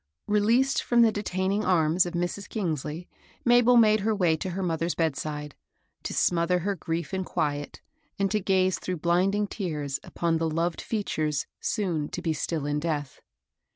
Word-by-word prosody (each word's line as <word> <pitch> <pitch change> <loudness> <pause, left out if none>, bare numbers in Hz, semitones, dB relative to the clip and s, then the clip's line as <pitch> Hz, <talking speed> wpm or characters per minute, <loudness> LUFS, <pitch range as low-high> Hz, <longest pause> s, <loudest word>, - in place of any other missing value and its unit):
Released 230 +6 +2
from 240 -1 +4
the 225 - +5
detaining 200 0 -1
arms 175 -1 +3
of 175 - -6
Mrs. 175 +4 -3
Kingsley, 165 - -3 0.4
Mabel 245 0 +6
made 215 -2 +5
her 215 +2 0
way 175 -5 +3
to 185 - -4
her 190 +2 -3
mother's 165 0 -1
bedside, 150 -2 -2 0.5
to - - -5
smodier 175 +1 +2
her 200 +4 0
grief 165 -3 -4
in 190 0 -1
quiet, 145 -4 -3 0.4
and 195 -1 0
to 215 - +2
gaze 185 -2 +2
through 185 -1 -3
blinding 185 +5 +2
tears 150 -9 -3
upon 165 -1 -1
the 165 0 0
loved 165 +2 -1
features 155 -9 -1
soon 170 -9 -1
to 180 - -5
be 165 -2 +1
still 155 0 -2
in 145 0 0
death. 150 -3 -3
175 Hz, 165 wpm, -27 LUFS, 160-200 Hz, 0.5 s, Mabel